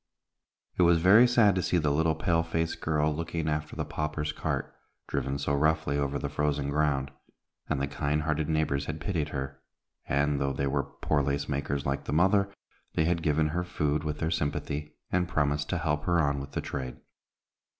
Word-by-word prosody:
It - - +6
was 85 -1 +6
very 105 +8 +7
sad 115 -5 +5
to 95 - 0
see 90 +1 +1
the 75 -3 +2
little 80 +2 +2
pale 85 -1 +2
faced 80 0 -2
child 75 -1 +1
looking 80 0 -3
after 75 0 -2
the - - -2
paupers' 75 0 -2
cart, - - -3 0.3
driven 70 0 -1
so 70 0 -1
roughly 75 0 +2
over 70 0 0
the 70 - -3
frozen 75 -1 -1
ground, 70 -2 +1 0.6
and - - 0
the 70 - +1
kind 75 +2 -1
hearted 75 0 -1
neighbors 75 -3 +1
had 80 0 -4
pitied 80 -4 -1
her, 65 -1 -5 0.5
and, 70 0 +1
though 70 0 0
they 70 - -1
were 70 +1 +1 0.2
poor 75 -2 +2
lace 70 0 -1
makers 70 0 -2
like 70 0 -1
the - - -3
mother, 100 +4 +3 0.4
they 80 - +3
had 85 0 +1
given 75 0 +2
her 90 +3 -1
food 75 -4 -1
with 75 -1 -2
their 80 0 -1
sympathy, 75 -1 -2 0.2
and 90 -1 +1
promised 75 -3 0
to 90 - 0
help 75 -3 -1
her 85 -1 +3
on 70 -3 +1
with 70 0 -8
the - - -1
trade. 65 -3 -5
75 Hz, 195 wpm, -29 LUFS, 70-80 Hz, 0.6 s, very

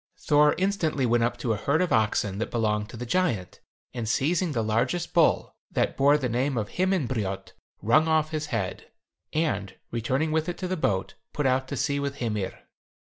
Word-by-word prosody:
Thor 150 0 +4
instantly 180 -8 0
went 120 0 +3
up 120 - 0
to 115 -4 -1
a - - -2
herd 140 +8 +1
of 180 -1 +1
oxen 105 -2 +1
that 115 - -2
belonged 105 -2 0
to 120 - -9
the 125 - -5
giant, 120 - -1 0.3
and 115 -3 -3
seizing 165 +8 +1
the 115 -5 0
largest 125 +11 0
bull, 165 -3 +3 0.2
that - - 0
bore 140 +2 +5
the 135 -4 -1
name 125 +3 0
of 105 -2 -2
Himinbrjot, 130 - -1 0.3
wrung 155 +9 +4
off 155 -1 +2
his 155 -1 -2
head, 95 -9 -3 0.4
and 155 - -1 0.2
returning 130 +7 0
with 160 +1 0
it 175 - -4
to 185 - -3
the 185 - -1
boat, 95 - -1 0.2
put 150 - -1
out 130 0 +2
to 140 - -4
sea 140 +2 0
with 140 -1 -2
Hymir. 105 -7 -3
135 Hz, 190 wpm, -26 LUFS, 115-155 Hz, 0.4 s, bore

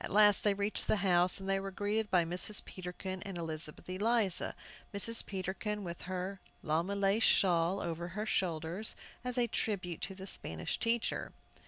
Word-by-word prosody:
At - - -4
last 205 0 +5
they 205 -1 +3
reached 205 +1 0
the - - +3
house, 180 0 +4
and 190 - -7
were 195 - -4
greeted 205 +2 -1
by 175 -2 +4
Mrs. 185 +5 -4
Peterkin 185 +1 -6
and 195 -2 -5
Elizabeth 160 -2 -1
Eliza, 200 0 +2 0.4
Mrs. 230 +3 +4
Peterkin 200 +2 -3
with 170 -1 -6
her 185 +1 -3 0.2
llama 165 +6 0
lace 200 +2 +2
shawl 180 -2 +4
over 170 -1 -3
her 210 +5 -4
shoulders, 175 +1 0 0.3
as 250 0 -3
a 245 - +4
tribute 195 -6 -2
to 190 - -3
the 190 0 -8
Spanish - - -3
teacher. 230 0 0
190 Hz, 165 wpm, -33 LUFS, 175-210 Hz, 0.4 s, last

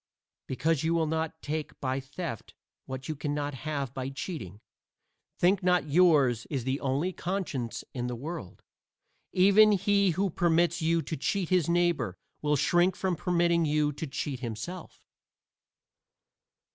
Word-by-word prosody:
Because 140 +3 0
you 165 +1 +1
will 165 -1 +2
not 160 0 -2
take 155 0 -4
by 130 0 -1
theft 135 - -7 0.3
what 130 0 -6
you 155 - -3
can 145 0 -3
have 145 -1 -3
by 130 0 -3
cheating, 135 - -6 0.8
think 190 +3 +3
not 180 -4 +2
yours 145 -9 +4
is 135 -5 -3
the 130 +3 -1
only 140 +7 -1
conscience 170 - -3
in 125 -1 -3
the 125 - -3
world. 145 - -7 0.7
Even 200 +3 +6
he 200 0 +3
who 195 -1 +1
permits 170 0 +2
you 165 0 +2
to 160 - -4
cheat 180 +5 -1
his 180 -4 +2
neighbor 170 - +1 0.2
will 150 0 +2
shrink 175 +6 +3
from 185 -2 -1
permitting 170 0 +2
you 150 -1 +2
to 155 +3 -5
cheat 135 -1 -4
himself. 125 +9 -7
155 Hz, 145 wpm, -29 LUFS, 135-175 Hz, 0.8 s, Even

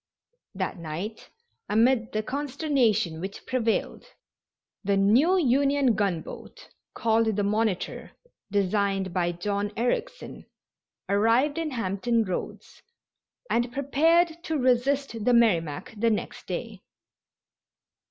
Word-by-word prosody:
That 185 -2 -3
night, 170 +7 -6 0.4
amid 230 +2 +3
the 215 0 -1
consternation 255 - 0
which 195 +2 -7
prevailed, 230 -3 -1 0.8
the 200 0 +1
new 245 - +4
Union 275 -3 +3
gun 195 -6 0
boat, - - -11 0.3
called 225 -1 +2
the 205 - 0
Monitor, 210 -2 -1 0.4
designed 195 -1 0
by 175 -2 +1
John 200 +4 -2
Ericsson, - - -3 0.6
arrived 230 - +2
in 325 -2 -2
Hampton 230 -1 0
Roads 185 -4 -6 0.7
and 240 +1 0
prepared 325 +5 +2
to 320 - -1
resist 255 -2 +1
the 250 - +3
Merrimac 170 -9 +1
the 230 +2 +1
next 215 - -3
day. - - -5
225 Hz, 105 wpm, -26 LUFS, 200-265 Hz, 0.8 s, new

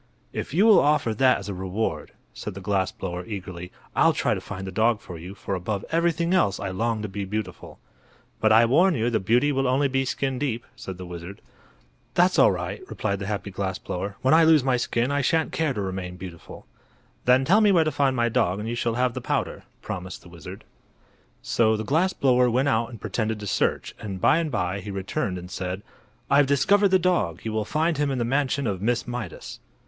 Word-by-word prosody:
"If - - -4
you 185 +9 +3
will 220 -3 +7
offer 145 -6 +2
that 130 +3 +4
as - - -8
a 100 - -3
reward," 95 -4 -3 0.2
said 105 - -7
the - - -6
glass 95 -1 0
blower, 90 -1 -5
eagerly, 90 -4 -7 0.2
"I'll - - +4
try - - +1
to - - -4
find 95 -1 -7
the 95 - -5
dog 110 +3 +2
for 90 -4 -9
you, 90 +4 -9
for 100 - -5
above 95 +2 -3
everything 170 +1 +1
else 100 - +2
I 100 - -3
long 110 +3 -1
to - - -2
be 100 +1 -5
beautiful." 95 -2 -5 0.6
"But 110 - +3
I 115 +2 +7
warn 165 +9 +4
you 120 0 0
the 110 - +1
beauty 120 +9 +2
will 135 -1 0
only 135 +3 +2
be 135 0 0
skin 135 0 -2
deep," 120 -5 -2
said 95 -2 -8
the 90 - -8
wizard. 90 +2 -8 0.8
"That's - - +4
all - - +7
right," - - -4
replied 100 -2 -2
the 100 - -5
happy 105 -1 -3
glass 95 0 -3
blower; 95 +2 -5
"when 130 +3 +4
I 165 +1 +7
lose 160 -4 +5
my 130 -1 +2
skin 120 +1 0
I 145 0 +1
shan't 160 +4 +1
care 160 -3 0
to 105 - -3
remain 95 -2 -4
beautiful." 90 -2 -10 0.6
"Then 130 +2 +4
tell 200 +8 +5
me 210 -2 +5
where 170 -4 +5
to 155 - -1
find 135 -3 +1
my 120 -1 +2
dog 95 -5 +1
and 105 - -4
you 115 - -2
shall 120 -1 -1
have 125 0 +1
the - - -5
powder," - - -2 0.2
promised 90 +1 -6
the 90 - -14
wizard. 85 -2 -10 0.8
So 110 -1 +2
the 110 - -3
glass 165 - +2
blower 125 -5 +3
went 130 +4 +2
out 115 -2 +1
and 115 -3 -10
pretended 110 -2 -2
to 105 - -7
search, - - -1
and 100 -3 -6
by 145 - +4
and 165 -2 -1
by 95 -5 -1
he 100 - -8
returned 95 -1 -3
and 90 +1 -9
said: 95 +2 -4 0.4
"I've 140 0 +4
discovered 200 +9 +4
the 190 0 +4
dog. 175 - 0
You 110 - -3
will 110 -1 -1
find 155 +4 0
him 145 -1 +1
in 135 - -1
the 120 - 0
mansion 135 +2 0
of 100 -5 -2
Miss 120 +3 0
Mydas." 120 -7 -6
115 Hz, 225 wpm, -25 LUFS, 95-135 Hz, 0.8 s, will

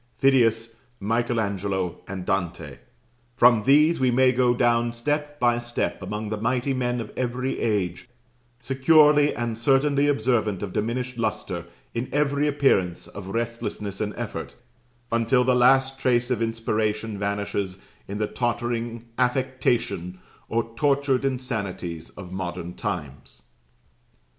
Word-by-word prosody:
Phidias, 115 -4 +3 0.2
Michael 115 +3 0
Angelo, 100 -3 -2
and 95 -1 -6
Dante, 95 -3 -2 0.6
from 120 -2 +6
these 150 +5 +5
we 130 -1 +3
may 130 +1 +4
go 125 -1 +2
down 120 0 +2
step 145 +4 -2
by 120 -1 +3
step 120 0 -3
among 105 0 -4
the 105 0 -4
mighty 125 +3 0
men 125 -1 -1
of 115 - -6
every 130 +1 -2
age, 100 -1 -1 0.5
securely 145 +3 +4
and 115 -1 -3
certainly 140 +3 +3
observant 110 -7 +1
of 100 - -5
diminished 125 +3 -2
lustre 110 -2 -3 0.3
in 120 +2 -3
every 145 0 +1
appearance 135 -12 +1
of 100 -2 -9
restlessness 110 -2 -3
and 105 -1 -2
effort, - - -5 0.6
until 115 +2 +3
the 130 0 +3
last 135 +2 +4
trace 125 -1 +1
of 120 -3 0
inspiration 110 -2 -1
vanishes 100 -2 -2 0.3
in 100 - -5
the 105 - 0
tottering 120 0 -2
affectation 125 -8 0 0.3
or 115 0 -1
tortured 140 0 +2
insanities 105 -11 -3
of 90 -2 -9
modern 90 -2 -5
times." 75 -12 -6
120 Hz, 130 wpm, -25 LUFS, 105-130 Hz, 0.6 s, from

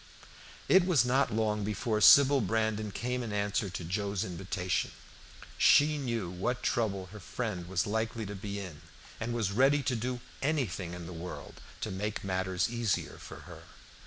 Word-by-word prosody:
It 190 - +6
was 150 -10 +4
not 130 +3 +2
long 105 -1 0
before 105 +1 -1
Sybil 140 +4 +8
Brandon 110 0 0
came 125 +4 -2
in 115 -3 -4
answer 100 0 -1
to 90 -1 -5
Joe's 100 +3 -2
invitation. 90 0 -2 0.7
She 150 +1 +5
knew 115 -8 -2
what 120 +8 -2
trouble 105 -6 0
her 105 - -9
friend 95 -3 -4
was 95 0 0
likely 110 +1 -2
to 100 - -6
be 100 0 -5
in, 90 -7 -8 0.4
and 115 +1 -3
was 115 -4 0
ready 135 +6 +3
to 130 - 0
do 125 +2 -3 0.2
anything 100 - -1
in 85 -1 -8
the 90 - -7
world 85 +2 -8 0.2
to - - -3
make 105 +3 -3
matters 95 -1 0
easier 115 -4 -2
for - - -10
her. - - -11
105 Hz, 165 wpm, -31 LUFS, 95-120 Hz, 0.7 s, Sybil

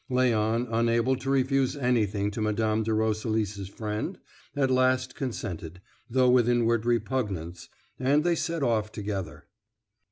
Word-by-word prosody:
Léon, 120 -2 +1
unable 115 +2 +2
to 135 - -5
refuse 135 0 +2
anything 105 -6 +1
to 110 - -4
Mme. 110 0 +1
de 110 0 -1
Roselis' 110 -2 -1
friend, 105 +1 -4 0.4
at 135 -2 +1
last 130 0 +2
consented, 90 - -5 0.3
though 130 +1 +3
with 125 -1 +4
inward 115 -1 +2
repugnance, 100 -8 -2 0.3
and 140 +4 +3
they 175 0 +2
set 165 -2 -2
off 110 -4 +1
together. 95 -9 -5
115 Hz, 130 wpm, -27 LUFS, 105-130 Hz, 0.4 s, with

